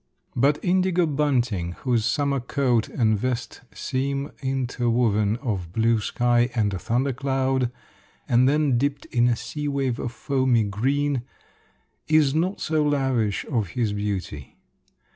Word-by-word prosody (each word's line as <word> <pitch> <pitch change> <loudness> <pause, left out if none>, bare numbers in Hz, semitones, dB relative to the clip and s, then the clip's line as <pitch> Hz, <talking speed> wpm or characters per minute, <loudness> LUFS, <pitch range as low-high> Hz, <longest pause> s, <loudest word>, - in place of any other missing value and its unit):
But 140 +4 +3
indigo 180 -1 +2
bunting, 125 - 0
whose 120 -4 +1
summer 140 +3 +1
coat 125 -2 0
and 110 -3 +1
vest 125 +1 -3
seem 140 +2 -3
interwoven 120 -5 +1
of 95 - -3
blue 115 +3 +2
sky 120 +2 +1
and 105 -4 +1
a 95 - -3
thunder 130 +6 0
cloud, 130 -1 0 0.6
and 125 +2 +4
then 145 -4 +2
dipped 140 +1 -1
in 120 0 +2
a 120 - +2
sea 145 +6 -5
wave 135 -4 -1
of 120 - -3
foamy 130 -4 +1
green, 135 +7 0 0.9
is 155 -3 +4
not 175 +5 0
so 155 -1 0
lavish 135 -8 0
of 115 -8 -1
his 115 -4 +1
beauty. 100 -9 -4
125 Hz, 135 wpm, -24 LUFS, 115-140 Hz, 0.9 s, and